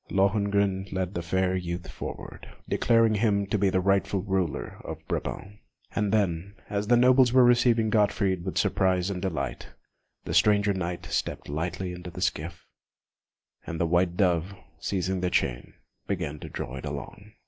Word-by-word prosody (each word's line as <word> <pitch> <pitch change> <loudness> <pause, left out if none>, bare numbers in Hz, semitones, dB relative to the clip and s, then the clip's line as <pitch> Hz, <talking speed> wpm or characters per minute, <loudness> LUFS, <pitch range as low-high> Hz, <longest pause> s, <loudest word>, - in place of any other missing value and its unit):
Lohengrin 100 -1 +1
led 95 0 -2
the 85 - -2
fair 95 +2 0
youth 90 -1 -4
forward, - - -8 0.2
declaring 115 -2 +3
him 100 -2 +2
to 100 +1 -1
be 100 0 +3
the 95 - +1
rightful 95 0 +1
ruler 95 -5 -2
of - - -8
Brabant; 105 +2 -4 0.4
and 105 -2 +1
then, 100 -2 0 0.2
as 105 0 -1
the 120 +1 +5
nobles 125 0 +5
were 130 0 +6
receiving 120 -2 +4
Gottfried 100 -4 +2
with 95 - -4
surprise 95 0 +2
and 90 -2 -4
delight, 80 -8 -3 0.6
the - - -3
stranger 105 -1 +4
Knight 90 -2 -4
stepped - - -3
lightly 90 +4 -3
into 90 0 -8
the 85 - -9
skiff, 85 -1 -2 1.0
and 80 - -4
the 85 - +2
white 85 +1 +1
Dove, 90 0 +1 0.2
seizing 95 -1 -1
the 90 - +1
chain, 60 -7 -1 0.3
began 80 -7 -3
to - - -8
draw 65 - -5
it - - -7
along. 105 +2 -8
95 Hz, 160 wpm, -27 LUFS, 90-105 Hz, 1.0 s, were